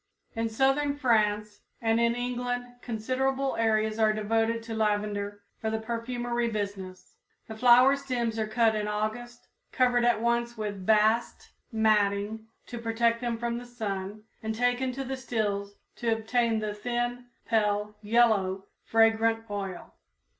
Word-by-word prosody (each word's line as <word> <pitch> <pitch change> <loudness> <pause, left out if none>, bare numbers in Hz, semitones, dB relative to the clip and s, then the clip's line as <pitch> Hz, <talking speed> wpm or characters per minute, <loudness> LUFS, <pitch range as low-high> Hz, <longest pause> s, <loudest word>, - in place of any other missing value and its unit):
In 225 0 -1
southern 270 +5 +1
France 210 -5 +1 0.2
and 225 0 +1
in 235 0 +2
England 245 0 -2 0.2
considerable 260 +4 -1
areas 220 -1 +1
are 215 -1 +4
devoted 225 +2 0
to 225 0 -6
lavender 205 -1 -1 0.2
for 220 - -2
the 220 - -1
perfumery 240 +1 -2
business. 200 -4 -6 0.3
The 220 - -7
flower 250 +3 +6
stems 245 -5 -2
are 215 - 0
cut 225 0 +3
in 210 -1 -2
August, 215 +3 -4 0.3
covered 245 -1 +3
at 240 -2 +3
once 235 0 0
with 205 -3 -5
bast 220 +2 +2 0.2
matting 215 0 +1 0.2
to 240 - -7
protect 230 +1 +1
them 240 -2 -1
from 235 0 -2
the 245 - -10
sun 210 -3 -5 0.2
and 220 0 -3
taken 245 +2 +1
to 270 +2 -4
the 265 0 -4
stills 205 -5 -2 0.2
to 235 -1 0
obtain 225 +1 +1
the 215 -1 -2
thin, 240 +3 -3 0.2
pale 210 -2 0
yellow, 205 -4 +2 0.2
fragrant 225 0 +3
oil. 195 -3 -5
225 Hz, 140 wpm, -28 LUFS, 215-240 Hz, 0.3 s, flower